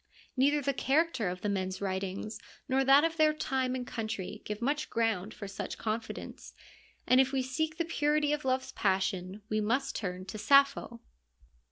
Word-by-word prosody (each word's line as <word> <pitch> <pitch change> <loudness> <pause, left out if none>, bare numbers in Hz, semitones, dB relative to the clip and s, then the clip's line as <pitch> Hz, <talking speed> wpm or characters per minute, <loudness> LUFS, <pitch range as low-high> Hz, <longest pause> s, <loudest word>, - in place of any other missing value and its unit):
Neither 285 +2 +3
the 280 +1 +1
character 270 - +1
of 180 0 -6
the - - -2
men's 190 -2 -2
writings 195 +2 -3 0.3
nor 265 0 +2
that 275 +2 +6
of 330 0 0
their 310 -1 +5
time 260 -4 -1
and 250 -1 -4
country 215 -3 -4
give 210 0 -4
much 290 +5 -1
ground 220 -3 0
for 205 - -8
such 195 - -5
con 220 +1 -1
fidence, - - -9 0.5
and 255 +1 +6
if 265 0 0
we 270 -1 0
seek 310 +5 -2
the 335 - 0
purity 300 -2 +1
of 300 - -2
love's 260 0 0
passion 190 0 -1
we 215 0 0
must 260 +6 0
turn 185 -3 -4
to 215 +2 -7
Sappho. 275 -2 +3
250 Hz, 180 wpm, -31 LUFS, 205-280 Hz, 0.5 s, that